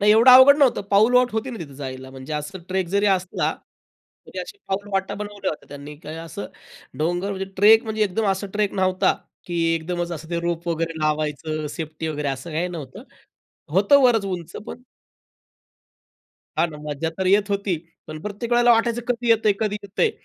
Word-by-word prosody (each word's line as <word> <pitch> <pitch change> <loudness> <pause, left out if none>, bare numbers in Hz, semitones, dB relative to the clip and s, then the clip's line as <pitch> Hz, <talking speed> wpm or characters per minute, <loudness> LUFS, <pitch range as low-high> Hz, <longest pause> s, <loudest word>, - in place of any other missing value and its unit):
नाही, 210 +1 +5
एवढं 230 +4 +7
अवघड 260 +3 +9
नव्हतं, 275 -4 +4
पाऊलवाट 245 +5 +5
होती 225 +4 -2
ना 230 - -7
तिथे 140 -5 -8
जायला. 130 -1 -7
म्हणजे 135 +3 -9
असं 150 +6 -5
ट्रेक 190 -1 -1
जरी 200 +2 +1
असला 185 -2 +1 0.7
तरी - - -9
अशी 405 - -9
पाऊलवाटा 195 0 -2
बनवल्या 205 -1 -4
होत्या 155 - -9
त्यांनी. 145 +1 -9
काही 155 +1 -9
असं 165 -3 -7 0.5
डोंगर 175 +5 0
म्हणजे 195 -1 -3
ट्रेक 220 +4 +6
म्हणजे 220 -1 -1
एकदम 210 +3 -1
असा 195 +1 -2
ट्रेक 210 -1 0
नव्हता 185 -1 +2 0.3
की 170 -1 -1
एकदमच 175 +1 -3
असं 160 +1 -8
ते 170 0 -1
रोप 170 0 -3
वगैरे 165 -1 -2
लावायचं, 155 0 -1
सेफ्टी 160 0 -5
वगैरे 150 -2 -2
असं 135 +4 -5
काही 175 +3 -1
नव्हतं. 150 -7 -8 0.7
होतं 210 +9 +5
बरंच 230 -5 +4
उंच 175 -3 -5
पण 245 - -8 1.8
हां 170 - +3
ना. 150 - -9
मज्जा 150 +3 -2
तर 190 - -1
येत 200 +1 +3
होती. 200 -4 0 0.3
पण 155 0 -7
प्रत्येक 210 +3 -5
वेळेला 240 0 +5
वाटायचं 235 +1 +2
कधी 240 -1 -1
येतंय? 220 -2 +4
कधी 210 -2 0
येतंय? 315 - 0
190 Hz, 180 wpm, -23 LUFS, 160-215 Hz, 1.8 s, अवघड